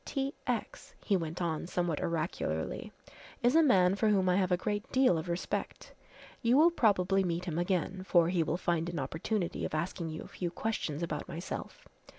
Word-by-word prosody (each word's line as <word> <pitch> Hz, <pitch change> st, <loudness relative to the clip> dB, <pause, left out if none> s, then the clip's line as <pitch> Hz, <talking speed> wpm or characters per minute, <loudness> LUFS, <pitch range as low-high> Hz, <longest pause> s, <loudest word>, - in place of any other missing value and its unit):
T. 275 Hz, 0 st, -2 dB
X.," -, -, -3 dB
he 200 Hz, -, +3 dB
went 165 Hz, 0 st, -2 dB
on 160 Hz, -1 st, -2 dB
somewhat 175 Hz, -4 st, -1 dB
oracularly, 155 Hz, -, -2 dB, 0.5 s
"is 245 Hz, +4 st, +4 dB
a 325 Hz, -, +7 dB
man 190 Hz, -, +5 dB
for 215 Hz, +2 st, +2 dB
whom 190 Hz, -3 st, +3 dB
I 180 Hz, -, +3 dB
have 185 Hz, -2 st, +1 dB
a 180 Hz, -, +4 dB
great 205 Hz, +3 st, -3 dB
deal 260 Hz, -8 st, +4 dB
of 165 Hz, +2 st, -3 dB
respect. 170 Hz, +1 st, -4 dB, 0.5 s
You 240 Hz, +1 st, +4 dB
will 330 Hz, +3 st, +6 dB
probably 195 Hz, -, +3 dB
meet 175 Hz, 0 st, -2 dB
him 170 Hz, -2 st, -2 dB
again, 185 Hz, +1 st, -1 dB
for 175 Hz, -3 st, +4 dB
he 175 Hz, -2 st, +1 dB
will 160 Hz, +1 st, 0 dB
find 170 Hz, -1 st, 0 dB
an 170 Hz, -, -5 dB
opportunity 165 Hz, +7 st, -2 dB
of -, -, -2 dB
asking 170 Hz, +1 st, -2 dB
you 155 Hz, 0 st, -6 dB
a -, -, -11 dB
few 175 Hz, -, -4 dB
questions 170 Hz, -5 st, -3 dB
about 150 Hz, -3 st, -3 dB
myself. 170 Hz, +4 st, -6 dB
180 Hz, 190 wpm, -31 LUFS, 170-205 Hz, 0.5 s, a